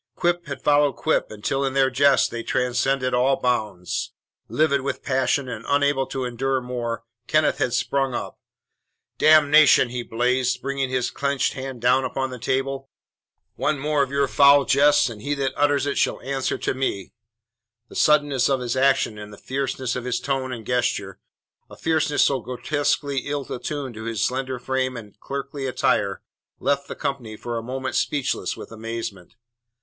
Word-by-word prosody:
Quip 175 Hz, 0 st, 0 dB
had 140 Hz, -2 st, -6 dB
followed 145 Hz, -1 st, +4 dB
quip 160 Hz, -, 0 dB
until 135 Hz, +6 st, -2 dB
in 135 Hz, -1 st, -1 dB
their 135 Hz, -1 st, +3 dB
jests 140 Hz, +2 st, +4 dB
they 115 Hz, -, -5 dB
transcended 125 Hz, +2 st, 0 dB
all 130 Hz, +2 st, +2 dB
bounds. 105 Hz, -7 st, -2 dB, 0.4 s
Livid 145 Hz, -3 st, +2 dB
with 140 Hz, 0 st, -4 dB
passion 130 Hz, 0 st, +1 dB
and 115 Hz, -3 st, -6 dB
unable 140 Hz, -2 st, +2 dB
to 130 Hz, -1 st, -3 dB
endure 130 Hz, +2 st, -1 dB
more, 120 Hz, -2 st, -4 dB, 0.2 s
Kenneth 155 Hz, 0 st, +2 dB
had 125 Hz, -, +1 dB
sprung 135 Hz, +1 st, 0 dB
up. -, -, -5 dB, 0.8 s
"Damnation!" 155 Hz, -3 st, +6 dB
he 125 Hz, 0 st, -3 dB
blazed, 125 Hz, +2 st, 0 dB
bringing 135 Hz, -1 st, -1 dB
his 130 Hz, -1 st, -1 dB
clenched 140 Hz, -1 st, 0 dB
hand 130 Hz, -3 st, -6 dB
down 125 Hz, +2 st, +3 dB
upon 130 Hz, 0 st, -2 dB
the 125 Hz, -, -7 dB
table. 135 Hz, +2 st, -2 dB, 0.7 s
"One 155 Hz, -, 0 dB
more 150 Hz, +1 st, 0 dB
of 135 Hz, -, 0 dB
your 140 Hz, 0 st, +1 dB
foul 140 Hz, +1 st, +6 dB
jests 145 Hz, -1 st, +4 dB
and 110 Hz, -4 st, -8 dB
he 145 Hz, +5 st, -1 dB
that 135 Hz, -1 st, -1 dB
utters 145 Hz, -1 st, +2 dB
it 145 Hz, -, -1 dB
shall -, -, +1 dB
answer 135 Hz, 0 st, -2 dB
to -, -, -1 dB
me!" 130 Hz, -8 st, -3 dB, 0.7 s
The -, -, -14 dB
suddenness 145 Hz, -4 st, +3 dB
of 135 Hz, -1 st, +2 dB
his 125 Hz, -1 st, -2 dB
action 130 Hz, -5 st, +2 dB
and 105 Hz, 0 st, -9 dB
the 105 Hz, -, -11 dB
fierceness 130 Hz, -2 st, -3 dB
of 125 Hz, -1 st, -4 dB
his 125 Hz, -, -1 dB
tone 135 Hz, -2 st, -2 dB
and 115 Hz, -3 st, -6 dB
gesture 125 Hz, +1 st, -1 dB, 0.5 s
a -, -, -13 dB
fierceness 155 Hz, -2 st, +2 dB
so 135 Hz, -2 st, +2 dB
grotesquely 140 Hz, +3 st, -1 dB
ill 145 Hz, -1 st, -2 dB
attuned 135 Hz, 0 st, -4 dB
to 110 Hz, 0 st, -8 dB
his 115 Hz, -2 st, -2 dB
slender 130 Hz, 0 st, -1 dB
frame 130 Hz, 0 st, -2 dB
and 105 Hz, -3 st, -11 dB
clerkly 140 Hz, +1 st, -5 dB
attire 130 Hz, -, 0 dB, 0.4 s
left 140 Hz, +1 st, 0 dB
the -, -, -6 dB
company 120 Hz, -6 st, -4 dB
for 120 Hz, +1 st, -5 dB
a 115 Hz, -, -2 dB
moment 130 Hz, +2 st, -4 dB
speechless 145 Hz, -3 st, -1 dB
with -, -, -10 dB
amazement. 115 Hz, -4 st, -6 dB
130 Hz, 170 wpm, -23 LUFS, 125-140 Hz, 0.8 s, Damnation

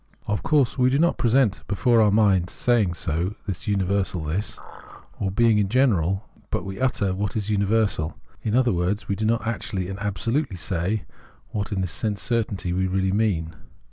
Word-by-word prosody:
Of 105 Hz, -, -1 dB
course 140 Hz, -4 st, +2 dB
we 125 Hz, 0 st, +5 dB
do 135 Hz, -, +2 dB
not 170 Hz, +3 st, +2 dB
present 120 Hz, -3 st, +3 dB
before 115 Hz, +2 st, +3 dB
our 105 Hz, -, +5 dB
mind 100 Hz, -3 st, +4 dB
in -, -, -11 dB
saying 105 Hz, -4 st, +1 dB
so 85 Hz, +5 st, -2 dB
the 100 Hz, -, -2 dB
universal 95 Hz, -3 st, 0 dB
this, 85 Hz, +8 st, -2 dB, 0.6 s
or 100 Hz, -, 0 dB
being 110 Hz, +2 st, +3 dB
in 100 Hz, -2 st, +1 dB
general, 100 Hz, -6 st, +2 dB, 0.2 s
but -, -, -2 dB
we 95 Hz, +2 st, -6 dB
utter 105 Hz, -7 st, +1 dB
what 100 Hz, +1 st, -2 dB
is 105 Hz, 0 st, -2 dB
universal; 100 Hz, -7 st, +1 dB, 0.2 s
in 110 Hz, 0 st, -1 dB
other 125 Hz, -1 st, +4 dB
words, 90 Hz, +4 st, -1 dB
we 100 Hz, -, 0 dB
do 110 Hz, -, -2 dB
not 115 Hz, 0 st, +1 dB
actually 95 Hz, -5 st, -3 dB
and 95 Hz, +1 st, -5 dB
absolutely 105 Hz, -, -1 dB
say 95 Hz, +4 st, -1 dB, 0.5 s
what 105 Hz, +1 st, -3 dB
in 95 Hz, -2 st, -1 dB
this 95 Hz, -2 st, -2 dB
sense 105 Hz, +2 st, -2 dB
certainty 105 Hz, -7 st, -1 dB
we 95 Hz, +1 st, +1 dB
really 95 Hz, 0 st, 0 dB
mean. 95 Hz, -6 st, 0 dB
100 Hz, 185 wpm, -24 LUFS, 95-115 Hz, 0.6 s, we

